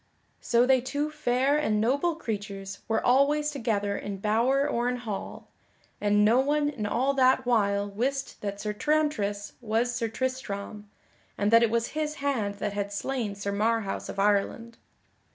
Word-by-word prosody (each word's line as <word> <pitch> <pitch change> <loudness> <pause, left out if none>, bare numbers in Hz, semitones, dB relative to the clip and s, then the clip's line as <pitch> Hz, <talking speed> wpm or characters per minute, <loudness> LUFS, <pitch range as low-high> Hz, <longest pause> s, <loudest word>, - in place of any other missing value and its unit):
So 240 +1 +3
they 260 -1 +4
two 285 +4 -2
fair 275 -1 +1
and 215 -8 +1
noble 280 +9 +1
creatures 200 -7 -5
were 225 -1 0
always 290 +4 +3
together 215 -7 -1
in 200 -1 -5
bower 235 +8 +2
or 240 +1 0
in 250 - -1
hall, 225 -5 -6 0.5
and 205 0 +3
no 230 +4 +5
one 290 +2 +2
in 230 -8 -4
all 260 +6 +1
that 260 -1 +3
while 205 -4 +2
wist 265 +7 -3
that 200 -1 -4
Sir 210 0 -3
Tramtris 210 -7 0
was 235 +1 0
Sir 235 -1 -1
Tristram, 215 -4 -4 0.5
and 205 +1 +1
that 230 0 +7
it 235 - +3
was 230 +1 0
his 305 0 -3
hand 260 -9 -1
that 200 0 -3
had 200 0 -3
slain 220 -1 -3
Sir 200 0 -3
Marhaus 215 0 -1
of - - -6
Ireland. 210 +3 0
230 Hz, 165 wpm, -27 LUFS, 205-270 Hz, 0.5 s, that